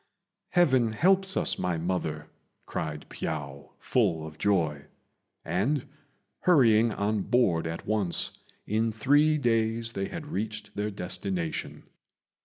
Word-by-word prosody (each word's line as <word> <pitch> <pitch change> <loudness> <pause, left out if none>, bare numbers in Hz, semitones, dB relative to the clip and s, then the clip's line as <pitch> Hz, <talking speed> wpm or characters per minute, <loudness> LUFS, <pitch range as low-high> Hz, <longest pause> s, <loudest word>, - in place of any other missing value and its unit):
"Heaven 130 -10 +3
helps 190 - +3
us, - - +1
my 90 -2 0
mother!" 80 -3 -2 0.4
cried 75 -1 -4
Piao, 70 -3 -5
full 90 -10 +1
of 80 0 -10
joy; 80 -8 +1 0.6
and, 120 - 0 0.5
hurrying 115 -9 +5
on 105 0 0
board 95 -9 +2
at 80 0 -5
once, 105 -5 0 0.3
in 110 +2 0
three 145 +8 +3
days 115 -3 0
they 95 0 -2
had 165 -3 -7
reached 110 -5 -5
their 105 +1 -1
destination. 90 -3 -3
105 Hz, 115 wpm, -28 LUFS, 85-120 Hz, 0.6 s, hurrying